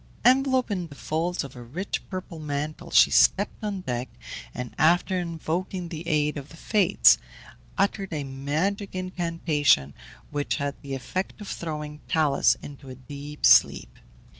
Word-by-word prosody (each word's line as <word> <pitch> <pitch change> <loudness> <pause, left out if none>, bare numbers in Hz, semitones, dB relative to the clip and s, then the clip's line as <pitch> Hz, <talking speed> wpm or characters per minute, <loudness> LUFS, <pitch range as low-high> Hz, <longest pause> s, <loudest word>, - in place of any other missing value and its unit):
Enveloped 260 -1 +4
in 180 -4 -2
the 145 - -13
folds 165 +5 -2
of 135 -2 -10
a 125 - -9
rich 155 +12 -4
purple 185 -3 -6
mantle, 155 +3 -4
she - - +6
stepped 200 +2 +3
on 200 -3 -3
deck, 125 -5 -3 0.4
and 125 - -6
after 175 +3 +3
invoking 175 +1 -3
the 165 0 -7
aid 150 -1 +1
of 140 +1 -7
the 165 - -13
Fates, 200 - +4 0.6
uttered 200 -1 0
a 150 -3 -2
magic 155 +10 -2
incantation, 165 - +1 0.4
which 145 -1 -1
had 140 -1 -2
the 140 -1 -5
effect 185 +11 -4
of 205 - -8
throwing 150 -4 -5
Talus 155 -4 +3
into 140 -1 -10
a 130 - -8
deep 145 +3 -6
sleep. - - +5
160 Hz, 150 wpm, -26 LUFS, 145-185 Hz, 0.6 s, she